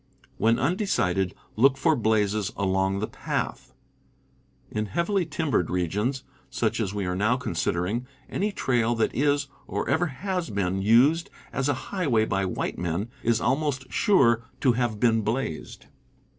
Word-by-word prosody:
When 115 Hz, +2 st, +3 dB
undecided, 95 Hz, -, 0 dB, 0.2 s
look 135 Hz, +4 st, +4 dB
for 160 Hz, +2 st, +3 dB
blazes 105 Hz, -3 st, +1 dB
along 95 Hz, 0 st, +1 dB
the 110 Hz, -, -1 dB
path. -, -, -4 dB, 1.0 s
In 105 Hz, 0 st, -2 dB
heavily 170 Hz, -, 0 dB
timbered 150 Hz, -, 0 dB
regions, 105 Hz, +10 st, -1 dB, 0.3 s
such -, -, -1 dB
as 95 Hz, -, -1 dB
we 100 Hz, -2 st, -3 dB
are 90 Hz, 0 st, -1 dB
now 110 Hz, +6 st, +2 dB
considering, 90 Hz, +2 st, -1 dB, 0.2 s
any 205 Hz, +3 st, -1 dB
trail 120 Hz, -, +1 dB
that 115 Hz, -, 0 dB
is, 145 Hz, +1 st, +1 dB, 0.2 s
or -, -, -3 dB
ever 175 Hz, +2 st, +2 dB
has 180 Hz, +5 st, -3 dB
been, 95 Hz, -2 st, -1 dB
used 130 Hz, -, +4 dB, 0.2 s
as 135 Hz, +1 st, 0 dB
a -, -, +2 dB, 0.2 s
highway 135 Hz, -, +2 dB
by 95 Hz, -2 st, 0 dB
white 90 Hz, -, -3 dB
men 90 Hz, +7 st, -2 dB
is 115 Hz, -1 st, +2 dB
al 125 Hz, +3 st, +3 dB
most 140 Hz, -4 st, -3 dB
sure 130 Hz, -, +4 dB, 0.2 s
to 130 Hz, -, +5 dB
have 120 Hz, -3 st, -1 dB
been 115 Hz, -1 st, +3 dB
blazed. 110 Hz, -7 st, -3 dB
115 Hz, 150 wpm, -26 LUFS, 100-140 Hz, 1.0 s, to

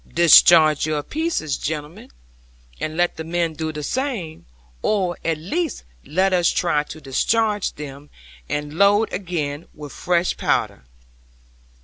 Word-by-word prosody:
'"Discharge 160 Hz, -2 st, +6 dB
your 150 Hz, -1 st, -1 dB
pieces, 310 Hz, -, -2 dB
gentlemen, 150 Hz, +1 st, -6 dB, 0.7 s
and 155 Hz, +1 st, -4 dB
let 175 Hz, 0 st, +1 dB
the 160 Hz, -, -5 dB
men 165 Hz, 0 st, -1 dB
do 160 Hz, 0 st, -4 dB
the 150 Hz, -1 st, -6 dB
same; 205 Hz, -, -4 dB, 0.3 s
or 185 Hz, -5 st, 0 dB
at 165 Hz, -2 st, 0 dB
least 305 Hz, -, -3 dB, 0.2 s
let 185 Hz, +5 st, +1 dB
us 175 Hz, -2 st, +3 dB
try 170 Hz, -4 st, +1 dB
to 150 Hz, +1 st, -10 dB
discharge 210 Hz, -, 0 dB
them, 145 Hz, 0 st, -9 dB, 0.4 s
and 150 Hz, +2 st, -4 dB
load 205 Hz, +2 st, +4 dB
again 165 Hz, -5 st, -4 dB
with 150 Hz, -2 st, -9 dB
fresh 175 Hz, 0 st, 0 dB
powder. -, -, -1 dB
165 Hz, 130 wpm, -21 LUFS, 150-185 Hz, 0.7 s, Discharge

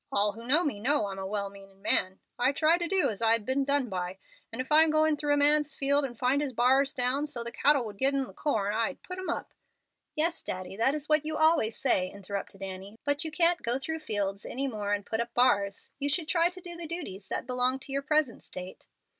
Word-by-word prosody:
All 205 Hz, +1 st, +3 dB
who 230 Hz, +3 st, -11 dB
know 305 Hz, +7 st, +5 dB
me 275 Hz, -10 st, -2 dB
know 260 Hz, 0 st, +2 dB
I'm 195 Hz, -1 st, -5 dB
a 190 Hz, -, -4 dB
well 200 Hz, 0 st, -3 dB
meanin' 195 Hz, -1 st, -15 dB
man. 190 Hz, -1 st, +1 dB, 0.2 s
I 255 Hz, +3 st, +3 dB
try 315 Hz, +3 st, +4 dB
to 345 Hz, -, -1 dB
do 380 Hz, -7 st, +2 dB
as 210 Hz, -, -7 dB
I'd 225 Hz, -1 st, +3 dB
be 260 Hz, -, 0 dB
done 280 Hz, -1 st, +1 dB
by. 180 Hz, -2 st, -4 dB, 0.3 s
If 255 Hz, +5 st, -5 dB
I'm 315 Hz, +1 st, +6 dB
going 310 Hz, 0 st, +3 dB
through 290 Hz, 0 st, +1 dB
a -, -, 0 dB
man's 295 Hz, 0 st, +3 dB
field 280 Hz, +1 st, +3 dB
and 240 Hz, -3 st, -7 dB
find 260 Hz, +4 st, +2 dB
his 280 Hz, -3 st, -2 dB
bars 265 Hz, +4 st, +3 dB
down, 260 Hz, +3 st, 0 dB
so 240 Hz, -5 st, -4 dB
the 235 Hz, -, -6 dB
cattle 280 Hz, -2 st, +3 dB
would 205 Hz, -2 st, -8 dB
get 275 Hz, +1 st, +3 dB
in 275 Hz, -, +1 dB
the -, -, -13 dB
corn, 210 Hz, -9 st, -1 dB
I'd 230 Hz, +5 st, -2 dB
put 365 Hz, 0 st, -7 dB
'em 370 Hz, -, -5 dB
up -, -, -4 dB, 0.3 s
" -, -, -55 dB
"Yes, 330 Hz, +2 st, 0 dB
Daddy, 185 Hz, +1 st, -5 dB
that 250 Hz, +7 st, +2 dB
is 300 Hz, -1 st, -5 dB
what 305 Hz, -1 st, +3 dB
you 310 Hz, 0 st, -3 dB
always 315 Hz, -9 st, +3 dB
say," 185 Hz, 0 st, +1 dB
interrupted 200 Hz, 0 st, -6 dB
Annie; 195 Hz, +2 st, -7 dB
"but 285 Hz, +2 st, +1 dB
you 320 Hz, -, -4 dB
can't 335 Hz, +2 st, +2 dB
go 235 Hz, +2 st, 0 dB
through 320 Hz, +4 st, -4 dB
the 310 Hz, -, -19 dB
fields 200 Hz, -3 st, -1 dB
any 275 Hz, +2 st, -2 dB
more 210 Hz, -5 st, -3 dB
and 205 Hz, -1 st, -1 dB
put 220 Hz, -, -2 dB
up 235 Hz, 0 st, -3 dB
bars. 200 Hz, -5 st, +2 dB
You 285 Hz, 0 st, 0 dB
should 315 Hz, +2 st, -1 dB
try 340 Hz, 0 st, +3 dB
to 365 Hz, +1 st, -11 dB
do 350 Hz, -1 st, -4 dB
the 340 Hz, -1 st, -3 dB
duties 210 Hz, -, -5 dB
that -, -, -3 dB
belong 250 Hz, +1 st, 0 dB
to 270 Hz, -, -10 dB
your 275 Hz, +1 st, 0 dB
present 300 Hz, -4 st, 0 dB
state." 185 Hz, 0 st, -9 dB
260 Hz, 250 wpm, -29 LUFS, 205-300 Hz, 0.3 s, I'm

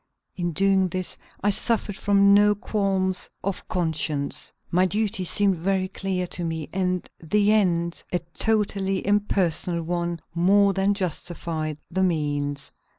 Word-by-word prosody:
In 175 Hz, -2 st, -2 dB
doing 195 Hz, +2 st, +3 dB
this 185 Hz, +1 st, -2 dB, 0.3 s
I 205 Hz, -, +3 dB
suffered 210 Hz, -1 st, 0 dB
from 200 Hz, 0 st, +4 dB
no 205 Hz, +1 st, +5 dB
qualms 195 Hz, -4 st, -1 dB
of 195 Hz, 0 st, -4 dB
conscience. 155 Hz, -4 st, -1 dB, 0.2 s
My 185 Hz, +2 st, +3 dB
duty 210 Hz, 0 st, -1 dB
seemed 195 Hz, +1 st, +3 dB
very 190 Hz, +2 st, 0 dB
clear 190 Hz, -1 st, -2 dB
to 175 Hz, 0 st, -4 dB
me, 160 Hz, -3 st, -3 dB
and 185 Hz, -1 st, -1 dB
the 205 Hz, +6 st, +2 dB
end, 170 Hz, -5 st, +1 dB
a 180 Hz, -, +2 dB, 0.2 s
totally 200 Hz, -3 st, 0 dB
impersonal 185 Hz, -4 st, +1 dB
one, 170 Hz, 0 st, -2 dB
more 195 Hz, +4 st, +4 dB
than 195 Hz, +1 st, +1 dB
justified 165 Hz, -4 st, -3 dB
the 190 Hz, -, 0 dB
means. 145 Hz, -5 st, -1 dB
185 Hz, 135 wpm, -24 LUFS, 170-200 Hz, 0.3 s, no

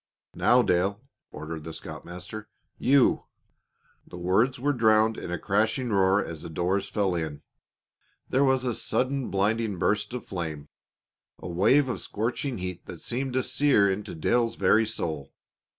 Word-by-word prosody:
"Now, 125 Hz, 0 st, +4 dB
Dale," 95 Hz, +2 st, +1 dB, 0.3 s
ordered 80 Hz, 0 st, -7 dB
the 80 Hz, +1 st, -7 dB
scoutmaster. 90 Hz, +7 st, -8 dB, 0.3 s
"You 135 Hz, -1 st, +3 dB, 0.4 s
" -, -, -39 dB
The -, -, -9 dB
words 105 Hz, +9 st, +1 dB
were 145 Hz, +3 st, +1 dB
drowned 110 Hz, -2 st, +4 dB
in 85 Hz, -, -6 dB
a 90 Hz, -, -1 dB
crashing 110 Hz, +6 st, 0 dB
roar 95 Hz, 0 st, +3 dB
as 80 Hz, -2 st, -7 dB
the -, -, -7 dB
doors 90 Hz, +4 st, -1 dB
fell 100 Hz, -3 st, 0 dB
in. 80 Hz, -4 st, -4 dB, 0.8 s
There 135 Hz, +2 st, +2 dB
was 130 Hz, -2 st, +2 dB
a 120 Hz, -, 0 dB
sudden, 130 Hz, +3 st, -1 dB
blinding 105 Hz, +1 st, 0 dB
burst 105 Hz, +5 st, 0 dB
of 125 Hz, -, -6 dB
flame, 80 Hz, -5 st, -5 dB, 0.7 s
a -, -, -8 dB
wave 100 Hz, +11 st, +3 dB
of 125 Hz, -, -3 dB
scorching 120 Hz, +4 st, -2 dB
heat 90 Hz, -1 st, -6 dB
that 85 Hz, -3 st, -9 dB
seemed 130 Hz, +2 st, -3 dB
to 130 Hz, 0 st, +1 dB
sear 130 Hz, -7 st, +3 dB
into 100 Hz, -1 st, -4 dB
Dale's 115 Hz, +8 st, +1 dB
very 110 Hz, -1 st, +3 dB
soul. 80 Hz, -10 st, -4 dB
105 Hz, 155 wpm, -27 LUFS, 90-125 Hz, 0.8 s, Now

